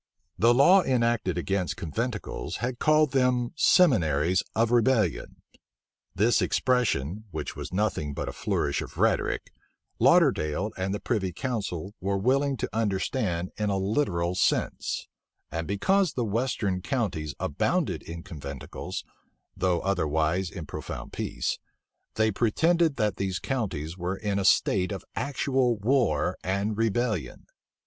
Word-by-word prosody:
The 115 +5 +5
law 160 +10 +6
enacted 115 - +1
against 95 +1 -1
conventicles 105 - -4
had 120 0 -3
called 155 -2 +4
them 125 -2 +2
seminaries 90 - +4
of 115 +1 +2
rebellion. 115 - +1 0.7
This 115 +4 +3
expression, 110 - 0
which 80 -3 -5
was - - -6
nothing 90 -7 -1
but - - -3
a - - -4
flourish - - -1
of - - -9
rhetoric, - - 0 0.5
Lauderdale 75 +8 +3
and 95 +1 -2
the 100 - -2
privy 100 -6 -1
council 100 -3 -4
were 100 +1 0
willing 135 +6 +1
to - - -3
understand 95 -4 -1
in 105 -1 0
a 100 - +1
literal 95 -4 0
sense; 90 - 0 0.4
and 80 0 -3
because 185 - +2
the 120 - -1
western 105 -4 -1
counties 90 - -2
abounded 70 - 0
in 85 0 -8
conventicles, 70 -7 -7 0.5
though 90 -2 +1
otherwise 85 -1 0
in 85 -1 -7
profound - - -7
peace, - - -2 0.6
they 110 0 +2
pretended 160 - +2
that 105 -5 0
these 95 -1 -1
counties 95 - -3
were 90 +2 -2
in 100 -1 -1
a 100 - -1
state 95 0 +3
of 100 - -5
actual 130 -3 0
war 105 - +1
and 100 +4 -1
rebellion. 115 -3 -1
100 Hz, 130 wpm, -27 LUFS, 90-125 Hz, 0.7 s, law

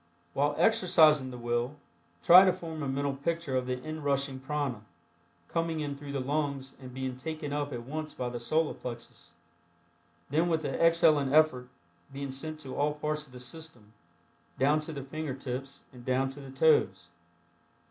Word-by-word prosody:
While 145 +1 +1
exercising 155 -10 +5
the 125 - -8
will, 120 +3 -1 0.5
try 180 +2 +10
to 190 - +5
form 165 -3 -6
a 140 - -2
mental 140 +1 -1
picture 155 0 -2
of 130 -1 0
the 125 0 -1
inrushing 140 -2 -2
prana, 135 -5 -2 0.7
coming 165 - -1
in 145 -2 -3
through 140 0 -8
the 140 - -1
lungs 140 0 -2
and 130 -1 -9
being 130 0 -4
taken 155 +1 -5
up 145 0 -2
at 120 -2 -5
once 155 +4 -5
by 125 -3 -4
the 120 0 -5
Solar 155 +6 +1
Plexus, 115 -7 -9 1.0
then 165 +4 +2
with 160 -1 +1
the - - -2
exhaling 155 -4 +4
effort, 150 -5 +4 0.4
being 140 0 -5
sent 155 +4 -6
to 135 -3 -7
all 150 +1 +1
parts 150 0 -3
of - - -19
the 125 - -10
system, 125 -5 -9 0.6
down 145 +3 +3
to 155 +1 -6
the 140 -3 -6
finger 145 0 -4
tips 135 +1 -6
and 125 -1 -12
down 130 +1 +1
to 140 - -10
the 135 -1 -10
toes. 130 - +2
140 Hz, 175 wpm, -30 LUFS, 130-155 Hz, 1.0 s, try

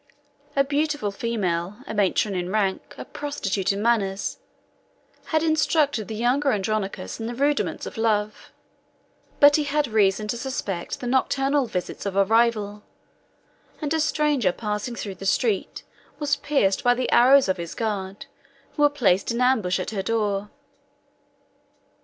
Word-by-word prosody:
A 275 - +4
beautiful 290 -5 -1
female, 195 -4 -2
a - - -6
matron 205 0 +1
in 180 -1 -3
rank, 200 -2 -1
a - - -7
prostitute 200 -10 -2
in 200 +1 -3
manners, 205 -4 0 0.9
had 315 0 0
instructed 300 -6 +1
the 220 - -5
younger 255 +5 +1
Andronicus 200 - -2
in 225 - -4
the 240 - -5
rudiments 285 +3 0
of - - -7
love; 215 -2 -1 0.9
but 290 +1 +7
he 305 - 0
had 295 +1 +1
reason 210 -1 +2
to 235 - -1
suspect 210 -9 -4
the - - -5
nocturnal 270 +2 +1
visits 180 0 -4
of 195 - -4
a 195 0 +4
rival; 215 -2 +1 1.0
and 300 -1 -2
a 320 - +1
stranger 295 - +1
passing 210 +4 -4
through 200 -4 -5
the - - -5
street 210 -1 0 0.3
was 290 -1 +1
pierced 205 -10 0
by 245 0 +4
the 255 +1 -2
arrows 260 +2 +6
of 190 0 0
his 170 -1 -6
guards, 200 -3 -3 0.5
who 295 - -4
were 290 - +6
placed 210 -10 +1
in 235 - -2
ambush 225 -8 +2
at 185 - -4
her 200 -3 -2
door. 205 -2 -1
225 Hz, 150 wpm, -24 LUFS, 195-275 Hz, 1.0 s, but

